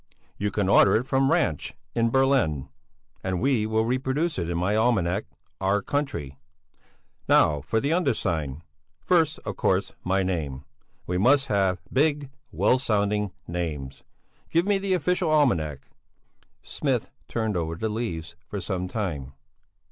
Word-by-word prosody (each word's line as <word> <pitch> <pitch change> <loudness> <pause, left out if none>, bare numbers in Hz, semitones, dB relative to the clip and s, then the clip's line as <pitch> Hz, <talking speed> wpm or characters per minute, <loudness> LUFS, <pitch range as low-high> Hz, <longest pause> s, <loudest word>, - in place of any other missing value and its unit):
You 105 - -1
can 100 -2 -1
order 100 0 +6
it 115 +3 +1
from 135 0 +2
Ranch 80 -3 0 0.2
in 115 -1 +2
Berlin, 130 - +2 0.5
and 95 -2 -1
we 125 -5 +2
will 110 0 +1
reproduce 130 - 0
it 85 -1 -2
in 85 - -1
my 95 +4 +1
almanac 105 -4 +1 0.3
'Our 100 +1 +1
Country.' 85 - -3 0.9
Now 75 -2 +4
for 110 - 0
the 140 +6 0
undersigned. 85 - -1 0.4
First, 160 -3 +2
of - - -4
course, - - +1
my 95 +1 +1
name. 75 -7 -3 0.4
We 90 0 -1
must 135 +5 +4
have 95 -2 +1
big, 145 0 +1 0.2
well 130 - +3
sounding 105 -4 +1 0.2
names. 75 -6 -4 0.5
Give 170 +2 +2
me 200 -1 +2
the 195 -1 +1
official 180 0 +1
almanac." 85 - +1 0.8
Smith - - -2 0.2
turned 110 -3 -1
over 80 -1 -2
the 110 +7 -2
leaves 85 -7 -4
for 100 - -4
some 90 0 -3
time. 80 - -4
105 Hz, 140 wpm, -26 LUFS, 85-135 Hz, 0.9 s, order